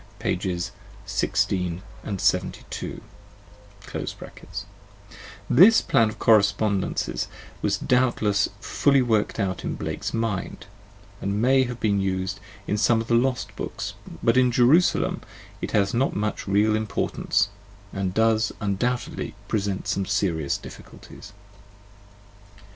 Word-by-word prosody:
1 - - +1 0.7
6 100 0 +1 0.6
and 100 -3 -4
72): - - -1 2.5
this 195 - +8
plan 110 -1 +3
of 110 - -8
correspondences 100 -2 +2 0.3
was - - +1
doubtless 120 -5 +2
fully 140 +3 +2
worked 110 -2 0
out 95 -3 -1
in - - -2
Blake's - - -4
mind, 115 -5 -3 0.6
and 100 +1 -1
may 130 +3 +4
have 120 -1 -6
been 100 -2 +1
used 95 +1 -2 0.3
in 105 - -1
some 115 +1 +4
of 115 - -5
the - - +2
lost 125 +1 +1
books, - - -5 0.3
but 115 +2 +3
in 125 -1 +4
"Jerusalem" 130 +9 +3 0.4
it - - -3
has 100 -1 +2
not 130 +4 +1
much 105 0 -2
real 105 +2 +3
import 110 -1 -2
ance, 100 +2 +2 0.4
and 95 -1 -1
does 110 +1 +2
undoubtedly 115 +4 -2
present 100 -3 -2
some 95 -1 -1
serious 80 -7 0
difficulties. 100 - -12
105 Hz, 115 wpm, -25 LUFS, 100-120 Hz, 2.5 s, this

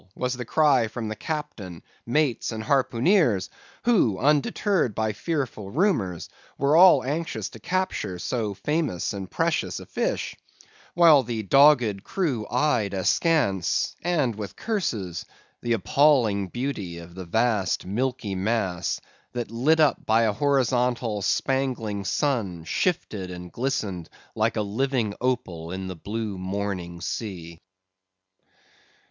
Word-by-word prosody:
was 125 0 -1
the 125 -1 -4
cry 135 -3 +3
from 110 -1 -4
captain, 110 - -6 0.2
mates, 135 -1 +1
and 110 -1 -4
harpooneers, 130 - +2 0.3
who, 190 - +3
undeterred 150 - +1
by 110 0 0
fearful 125 - -3
rumours, 115 - 0 0.3
were 140 +2 +2
all 175 -6 +7
anxious 155 +5 -3
to - - -12
capture 185 - -2
so 105 +1 -2
famous 150 - -1
and 95 -2 -6
precious - - -1
a - - -10
fish; - - -2 0.6
while 165 -5 +7
the 115 -3 -4
dogged 125 -4 +5
crew 145 - -2
eyed 120 -6 +1
askance, 95 - +1
and 155 -9 +1
with 105 -2 -7
curses, 110 - -2 0.4
the 120 -1 0
appalling 115 -3 +3
beauty 110 -7 -4
of 85 0 -11
the 95 0 -7
vast 110 0 +1
milky 115 +1 -2
mass, 95 -2 -1 0.3
that 120 -3 -4
lit 140 +8 +2
up 155 -2 +3
by 110 +1 +4
a 110 -2 +2
horizontal 125 -4 +1
spangling 120 -3 -1
sun, 100 - -1
shifted 105 - -1
and 90 -1 -8
glistened 105 - -3 0.2
like - - 0
a 105 - +1
living 115 +1 -1
opal 120 -11 -2
in 95 +1 -4
the 95 -1 -5
blue 105 +2 -4
morning 95 -2 -4
sea. 85 -3 -5
115 Hz, 125 wpm, -25 LUFS, 100-140 Hz, 0.6 s, all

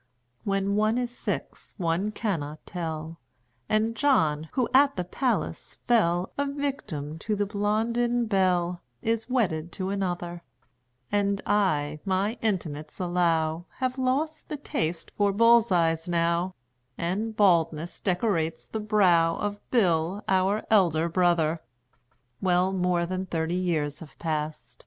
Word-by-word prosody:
When 195 0 0
one 215 +2 +2
is 245 -1 -2
six - - -4
one 175 +2 0
cannot 155 -10 -3
tell; 160 -2 -5 0.5
And 220 +1 +1
John, 160 - +2
who 255 -3 +1
at 280 +1 +5
the 180 - -1
Palace 250 +8 -2
fell 180 -6 +2
A 285 - +2
victim 260 - -4
to 210 +5 -1
the 205 0 0
Blondin 230 +4 0
Belle, 180 -4 +1 0.2
Is 225 +1 -1
wedded 175 -10 0
to 190 -1 -3
another; 175 -3 -3 0.7
And 200 -1 +1
I, 155 -8 +1
my 195 +4 0
intimates 155 -8 -3
allow, 170 -2 +1
Have 255 0 -2
lost 285 +5 -1
the 300 - -3
taste 165 - -3
for 205 -1 +1
bull's 230 +1 +5
eyes 165 -1 +2
now, 170 +2 +1 0.4
And 205 +6 -2
baldness 170 -5 +2
decorates 175 -4 0
the 220 - -4
brow 180 -6 +3
Of 205 0 -3
Bill, 185 -3 +2
our 190 +3 +2
elder 170 -6 +4
brother. 170 -2 +2 0.8
Well, 185 0 +2
more 180 -2 +1
than 185 +2 -3
thirty 165 -1 -1
years 165 -5 -1
have 150 -5 -12
passed... 150 -6 -4
185 Hz, 130 wpm, -27 LUFS, 165-215 Hz, 0.8 s, at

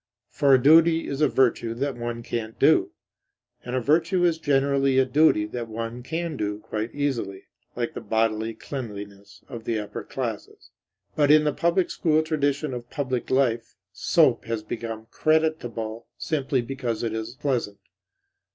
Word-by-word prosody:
For 140 -1 +4
a - - +4
duty 160 +4 +5
is 140 +1 -4
a 150 - +5
virtue 120 -3 +1
that 135 +2 -2
one 120 0 -5
can't 115 -1 -4
do. - - +4 0.7
And 125 +1 -4
a - - +2
virtue 165 - +2
is 165 -2 +1
generally 140 -2 +2
a 130 - +5
duty 130 -5 +3
that 115 +2 -5
one 115 +2 -5
can 165 +4 -3
do 105 -4 -2
quite 110 +1 -4
easily; 125 -9 -2 0.3
like - - -2
the - - -6
bodily 110 0 0
cleanliness 100 -6 -8
of 120 -4 -8
the 115 - 0
upper 105 -1 -5
classes. - - -6 0.4
But 145 -2 +3
in 150 0 +7
the 150 -1 +1
public 170 +4 +1
school 155 -1 +2
tradition 145 -2 -1
of 120 -1 -7
public 130 -4 -3
life, 120 -4 +1 0.2
soap 140 - +3
has 115 -2 -3
become 110 0 -5
creditable 120 -8 0
simply 135 -5 -1
because 120 -3 -3
it 115 -2 -1
is 110 +2 -5
pleasant. 125 -7 -2
125 Hz, 160 wpm, -25 LUFS, 115-145 Hz, 0.7 s, in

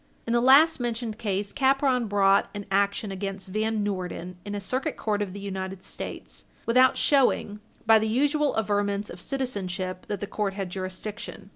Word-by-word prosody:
In 230 - -1
the 240 - +3
last 280 +6 +6
mentioned 235 -2 -3
case, 200 -2 -2
Capron 265 -3 +2
brought 195 -1 +3
an 205 -1 -5
action 200 +1 +1
against 195 0 -5
Van 215 +1 0
Noorden 180 -2 -4
in 205 0 -5
a - - -2
Circuit 255 +7 -2
Court 210 -2 -1
of 200 -2 -2
the 200 - -7
United 190 -1 -5
States - - -7 0.2
without 255 +2 +5
showing, 250 -7 +2 0.3
by 225 0 +7
the 220 0 -1
usual 290 +4 +1
averments 205 -1 0
of 175 - -9
citizenship, 190 -9 -3
that 205 - -3
the 205 - -3
court 200 -1 -2
had 195 -3 -4
jurisdiction. 195 +3 -6
205 Hz, 170 wpm, -26 LUFS, 195-235 Hz, 0.3 s, by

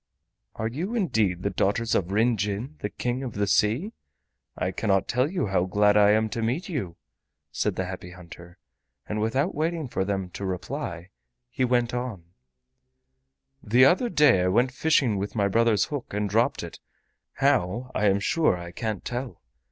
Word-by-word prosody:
"Are 110 - -2
you 170 - -4
indeed 110 - 0
the 100 - 0
daughters 105 +5 0
of 95 -1 0
Ryn 115 +4 +3
Jin, 105 +8 -3
the 105 - -3
King 125 +4 -3
of 125 -4 -5
the 100 0 0
Sea? 115 - +1 0.6
I 90 - -1
cannot 95 0 0
tell 125 +4 +1
you 185 -6 -1
how 95 -3 +1
glad 105 +2 +3
I 105 -1 +6
am 110 +1 +3
to 115 - -3
meet 125 +11 -1
you," 125 - -4 0.6
said - - -1
the 95 - -2
Happy 90 -1 -7
Hunter. 85 -1 -13 0.5
And 105 0 -2
without 130 - 0
waiting 160 0 -2
for 105 - -1
them 95 -2 -3
to 100 - -7
reply 90 -1 -5 0.4
he 130 - -1
went 120 -1 +1
on: 120 -7 -4 1.4
"The 120 +5 +5
other 190 - +3
day 145 - +4
I 90 - +1
went 120 +7 +2
fishing 130 -6 +2
with 100 +3 -4
my 100 -2 +2
brother's 110 -1 +3
hook 140 -8 -6
and 105 0 0
dropped 110 +4 +1
it, - - -9 0.5
how, 125 -3 +1
I 105 - +1
am 100 0 +3
sure 150 - +2
I 85 0 -8
can't 110 +1 -4
tell. 125 0 -5
110 Hz, 175 wpm, -26 LUFS, 95-130 Hz, 1.4 s, I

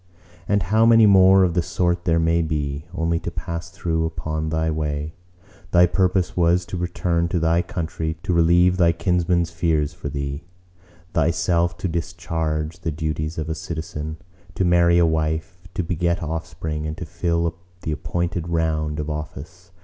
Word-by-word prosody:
"And 100 -2 +2
how 110 +6 +3
many 115 -1 +7
more 95 -1 +7
of 90 -2 +2
the 90 - +2
sort 85 +1 -1
there 85 -1 +3
may 85 +1 +2
be; 75 -2 -2
only 85 -1 0
to - - -4
pass 85 0 -5
through 80 -3 -1
upon 80 -1 -3
thy 80 0 0
way! 75 0 -3 0.6
Thy 90 0 +6
purpose 90 0 +1
was 85 +1 +3
to - - -6
return 85 -1 0
to 85 - -1
thy 85 +1 +2
country; 80 -4 -4
to 90 - 0
relieve 85 +2 +4
thy 85 -2 +4
kinsmen's 85 -1 +1
fears 80 -3 0
for 70 - -6
thee; 70 +2 -4 0.7
thyself 85 +2 +1
to 90 - -2
discharge 80 -1 -3
the 85 -2 -3
duties 75 0 -3
of 80 -1 -3
a 80 - -1
citizen; 80 -1 -5 0.4
to 95 - +1
marry 85 0 +4
a 85 - +5
wife, 80 +3 -2
to 95 - 0
beget 85 +1 -1
offspring, 80 -1 -4
and 80 +1 -5
to 90 - -5
fill 85 0 -1 0.3
the 80 - -2
appointed 85 +3 -2
round 80 -2 0
of 75 - -3
office. 75 +4 -7
85 Hz, 165 wpm, -22 LUFS, 80-90 Hz, 0.7 s, many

